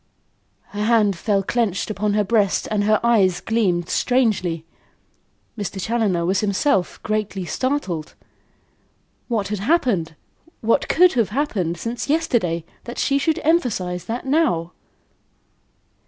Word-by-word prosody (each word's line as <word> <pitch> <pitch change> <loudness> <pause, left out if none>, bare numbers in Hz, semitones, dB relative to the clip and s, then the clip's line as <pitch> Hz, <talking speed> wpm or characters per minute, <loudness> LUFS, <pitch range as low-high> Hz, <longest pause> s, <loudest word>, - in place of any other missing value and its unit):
Her 210 0 -4
hand 215 -4 +3
fell 195 +2 0
clenched 215 -2 -1
on 210 0 +1
her 210 - +3
breast 205 -2 +1
and 205 -1 +1
her 215 0 +3
eyes 205 -7 +3
gleamed 185 -7 0
strangely. 195 -12 0 0.9
Mr. 205 -3 -5
Challoner 200 -5 0
was 190 +2 +1
himself 200 -1 0
greatly 210 -3 -2
startled. 195 - -2 1.1
What 220 -5 -1
had 210 -1 -2
happened 205 - +1 0.5
what 230 +1 +2
could 360 +1 +5
have 230 -5 +1
happened 205 - -1
since 235 +8 -4
yesterday 230 - 0 0.2
that 240 - -7
she 275 0 +1
should 320 +3 0
emphasise 205 - 0
that 235 +3 -4
now? 265 - +1
210 Hz, 125 wpm, -21 LUFS, 185-240 Hz, 1.1 s, could